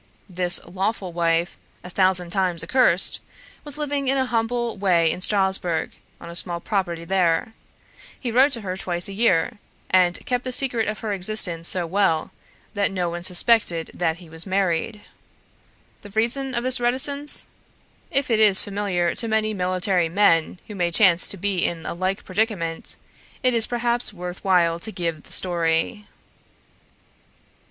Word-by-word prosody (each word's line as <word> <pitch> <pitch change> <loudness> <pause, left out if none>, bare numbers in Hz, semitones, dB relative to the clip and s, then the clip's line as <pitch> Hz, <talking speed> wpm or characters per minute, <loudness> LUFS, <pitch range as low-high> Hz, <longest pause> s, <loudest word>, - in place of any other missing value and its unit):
This 180 -2 +1
lawful 190 +1 -3
wife, 170 0 0 0.3
a 180 - -9
thousand 185 -2 +1
times 180 -3 +1
accursed, 190 -2 +3 0.4
was 295 -1 -3
living 285 -2 -3
in 270 +1 +2
a 260 - +1
humble 235 0 -2
way 175 -5 +2
in - - -5
Strasbourg 190 -4 +1 0.3
on - - -11
a 170 - -9
small 175 0 +1
property 170 -4 -3
there; 185 +4 0 0.7
he 245 - -4
wrote 265 +5 +4
to 230 - 0
her 185 -2 -4
twice 175 -2 -1
a 195 - -7
year, 195 -4 +1 0.3
and 180 -1 +2
kept 250 0 -1
the 255 - -4
secret 245 -3 +1
of 215 0 -4
her 215 -2 -3
existence 180 -4 +2
so 180 -2 -1
well, 165 -2 0 0.4
that 205 -2 0
no 180 -3 -2
one 175 0 -5
suspected 180 -2 +1
that 165 -2 -1
he 175 -2 -14
was 165 +3 -4
married. 190 +2 -1 1.0
The 205 - -12
reason 240 +6 -1
of 235 - -2
this 255 0 +4
reticence? 280 +4 0 0.6
If 275 -2 -1
it 220 - +2
is 205 -3 +6
familiar 195 -4 -1
to 230 - +1
many 220 -1 0
military 185 -2 0
men 170 -2 +2
who 210 - -8
may 175 -3 -1
chance 180 0 +3
to 200 - -1
be 190 -1 -1
in 165 -2 -3
a - - -4
like 185 +3 -3
predicament, 185 -5 -3 0.5
it 255 -1 +2
is 230 -1 +7
perhaps 240 -1 -1
worth 180 -2 -8
while 170 -3 +2
to 220 - -5
give 165 -5 -3
the - - -14
story. 175 +4 +1
190 Hz, 160 wpm, -22 LUFS, 175-225 Hz, 1.0 s, is